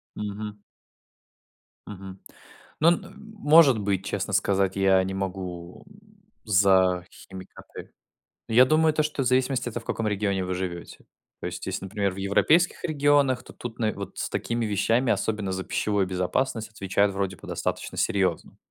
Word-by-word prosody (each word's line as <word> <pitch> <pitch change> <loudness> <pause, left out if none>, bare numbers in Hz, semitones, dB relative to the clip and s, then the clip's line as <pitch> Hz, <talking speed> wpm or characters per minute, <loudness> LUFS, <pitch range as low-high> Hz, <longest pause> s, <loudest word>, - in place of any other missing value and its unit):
Мгм. 105 0 -6 1.3
Мгм. 95 -1 -9 0.6
Ну, 155 - +3
н 175 - -2 0.2
может 150 - +6
быть, 100 -2 -1
честно 100 0 -3
сказать, 95 -1 +1
я 95 -1 +4
не 95 +1 -4
могу, 90 -2 -6
м, 205 +1 -21 0.3
за 95 -3 +3
химикаты. 95 -1 -12 0.6
Но 115 - -3
я 125 +2 +8
думаю, 155 +3 +3
то, 155 - +2
что 150 -2 -2
в - - -3
зависимости 130 0 +1
это 120 0 -5
в - - -17
каком 115 - -2
регионе 100 -2 -1
вы 90 0 -3
живете. 90 -2 -6 0.4
То - - -5
есть - - -6
если, - - -4
например, 100 -1 -1
в - - -11
европейских 150 - +2
регионах, 145 -4 +2
то - - -13
тут 120 -2 -8
нав 110 -2 0
вот 100 -1 -8
с - - -2
такими 115 -1 -2
вещами, 115 +4 +1
особенно 105 -1 -2
за 95 0 -3
пищевую 100 -2 0
безопасность, 105 +6 -1
отвечают 100 -1 0
вроде 95 0 -2
бы - - -13
достаточно - - -3
серьезно. 95 -4 -1
100 Hz, 160 wpm, -25 LUFS, 95-125 Hz, 1.3 s, я